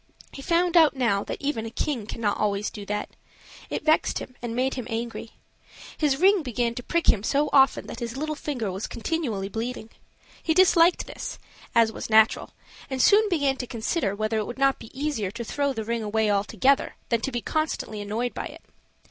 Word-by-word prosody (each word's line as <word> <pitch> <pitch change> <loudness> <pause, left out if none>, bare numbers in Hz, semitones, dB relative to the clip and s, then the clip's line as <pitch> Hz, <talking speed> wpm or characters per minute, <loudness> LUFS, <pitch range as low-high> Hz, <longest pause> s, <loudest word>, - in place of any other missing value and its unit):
He 275 - -9
found 345 +4 +1
out 320 -4 +6
now 230 -6 +1
that - - -5
even 280 -5 -2
a 225 - -5
king 235 -2 -3
cannot 220 -3 -2
always 205 0 0
do 205 -1 -9
that; 210 0 -3 0.6
it - - -4
vexed 315 0 +3
him 255 - -7
and 235 -1 -4
made 260 +2 +1
him 250 -3 -5
angry. 230 0 -4 0.6
His 290 -3 +1
ring 385 +4 +5
began 240 -4 -1
to 245 - -5
prick 340 +6 -1
him 200 - +4
so 285 +7 +1
often 270 -1 +5
that - - -8
his 235 +1 -5
little 310 +2 -2
finger 265 -9 -3
was 190 +3 -4
continually 230 -7 -2
bleeding. 225 +2 -5 0.5
He 320 - 0
disliked 355 -1 +5
this, - - -7 0.4
as 230 -1 +5
was - - -7
natural, 220 0 +4 0.4
and 265 -1 -3
soon 420 - +5
began 285 -7 +1
to 250 - -5
consider 230 - -1
whether 215 +1 -1
it 210 - -3
would 240 - -6
not 275 0 +2
be - - -11
easier 280 -10 -1
to 230 +4 -6
throw 280 +4 -1
the 225 -5 -4
ring 230 +1 -1
away 215 0 +1
altogether 220 +7 +2
than 235 -2 +1
to 270 - -2
be 240 -1 -2
constantly 310 -9 -2
annoyed 225 +4 -2
by - - -4
it. - - -13
240 Hz, 200 wpm, -25 LUFS, 220-290 Hz, 0.6 s, out